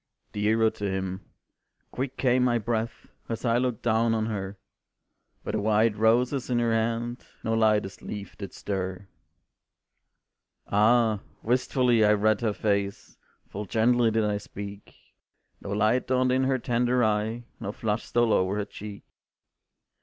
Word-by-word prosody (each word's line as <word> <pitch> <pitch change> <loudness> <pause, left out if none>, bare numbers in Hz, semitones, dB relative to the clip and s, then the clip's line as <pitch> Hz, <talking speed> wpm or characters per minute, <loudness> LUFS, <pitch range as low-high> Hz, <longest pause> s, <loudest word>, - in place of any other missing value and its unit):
"Dearer 110 +2 +2
to 100 -1 -4
him," 95 0 -3 0.7
quick 130 +1 -4
came 125 -1 +3
my 120 -1 +3
breath 115 +1 -3 0.2
As 115 +2 -4
I 115 0 +3
looked 125 -3 -2
down 115 0 +2
on 110 -1 0
her, 100 -3 -4 0.9
But - - -3
the 110 - -1
white 110 +1 +3
roses 120 +5 +2
in 125 - +1
her 120 -1 +2
hand 115 +2 -1 0.2
No 110 - 0
lightest 110 -3 +1
leaf 100 -1 -7
did 100 -2 -7
stir. 95 -1 -4 1.6
Ah! 110 +1 +3 0.2
wistfully 125 -1 +2
I 105 0 +5
read 105 0 +2
her 110 -3 +1
face, 100 -1 -2 0.4
Full 105 +2 -5
gently 115 +3 +3
did 110 -1 +1
I 105 -1 0
speak, 100 0 -9 0.7
No - - -7
light 110 +5 +1
dawned 130 0 +2
in 130 +1 +2
her 130 0 +2
tender 125 0 +1
eye, 110 +2 0 0.2
No 100 - -4
flush 105 0 -2
stole 120 -2 +2
o'er 95 +1 +2
her 105 -1 -1
cheek. 105 0 -9
110 Hz, 145 wpm, -27 LUFS, 105-120 Hz, 1.6 s, I